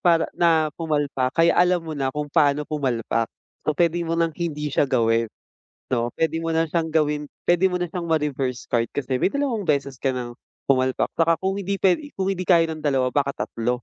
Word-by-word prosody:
para 170 Hz, -3 st, +4 dB
na 170 Hz, -1 st, +3 dB, 0.2 s
pumalpak 145 Hz, -5 st, -1 dB
kaya 165 Hz, +1 st, +5 dB
alam 180 Hz, -1 st, +3 dB
mo 160 Hz, -, -5 dB
na 135 Hz, -3 st, -1 dB
kung 150 Hz, +2 st, -3 dB
paano 145 Hz, 0 st, +3 dB
pumalpak. 120 Hz, -6 st, -1 dB, 0.4 s
So 155 Hz, -, +1 dB
puwede 170 Hz, 0 st, +2 dB
mo 165 Hz, 0 st, -1 dB
ng 165 Hz, -1 st, +1 dB
hindi 150 Hz, -4 st, -3 dB
siya 140 Hz, -, +2 dB
gawin, 115 Hz, -2 st, +2 dB, 0.6 s
'no. 120 Hz, -1 st, -1 dB
puwede 160 Hz, 0 st, 0 dB
mo 165 Hz, 0 st, -2 dB
na 165 Hz, -1 st, +1 dB
siyang 165 Hz, -2 st, 0 dB
gawin 150 Hz, -1 st, +1 dB, 0.2 s
puwede 175 Hz, +2 st, +3 dB
mo 180 Hz, -, -1 dB
na 175 Hz, -2 st, -2 dB
siyang 175 Hz, -1 st, -4 dB
ma-reverse 140 Hz, -6 st, -1 dB
card 115 Hz, -1 st, +2 dB
kasi 130 Hz, -2 st, -1 dB
may -, -, +2 dB
dalawang 250 Hz, -9 st, -1 dB
beses 140 Hz, -4 st, 0 dB
ka 135 Hz, -1 st, 0 dB
ng 120 Hz, -1 st, -6 dB, 0.3 s
pumalpak 130 Hz, -1 st, +2 dB
'tsaka 165 Hz, 0 st, +4 dB
kung 195 Hz, +1 st, 0 dB
hindi 200 Hz, 0 st, -2 dB
puwede 195 Hz, +10 st, +1 dB
kung 190 Hz, 0 st, -1 dB
hindi 185 Hz, -2 st, -3 dB
kaya 165 Hz, -3 st, +4 dB
ng 155 Hz, -, -5 dB
2 130 Hz, -2 st, +2 dB
baka 140 Hz, 0 st, 0 dB
3 120 Hz, +1 st, -2 dB
155 Hz, 205 wpm, -23 LUFS, 130-170 Hz, 0.6 s, kaya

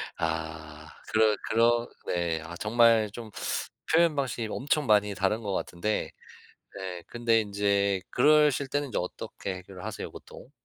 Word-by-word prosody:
아. 80 Hz, -1 st, -4 dB, 0.2 s
그러 110 Hz, -1 st, +4 dB
그러 120 Hz, +1 st, +3 dB, 0.2 s
네. 85 Hz, -2 st, -1 dB
아 85 Hz, +1 st, -8 dB
정말 115 Hz, 0 st, +4 dB
좀 115 Hz, 0 st, -8 dB, 0.6 s
표현 165 Hz, -1 st, +5 dB
방식이 125 Hz, -5 st, -2 dB
엄청 145 Hz, +4 st, 0 dB
많이 105 Hz, -2 st, +3 dB
다른 95 Hz, +4 st, 0 dB
것 100 Hz, -3 st, -3 dB
같은데 95 Hz, +3 st, -2 dB, 0.7 s
네 90 Hz, -3 st, -6 dB
근데 115 Hz, -1 st, +2 dB
인제 100 Hz, -2 st, +1 dB
그러실 150 Hz, 0 st, +4 dB
때는 145 Hz, +1 st, -1 dB
인제 125 Hz, -, -4 dB
어떻게 95 Hz, +1 st, -5 dB
해결을 90 Hz, 0 st, -10 dB
하세요 110 Hz, -1 st, -5 dB
보통? 130 Hz, -, -13 dB
105 Hz, 270 characters per minute, -28 LUFS, 95-120 Hz, 0.7 s, 표현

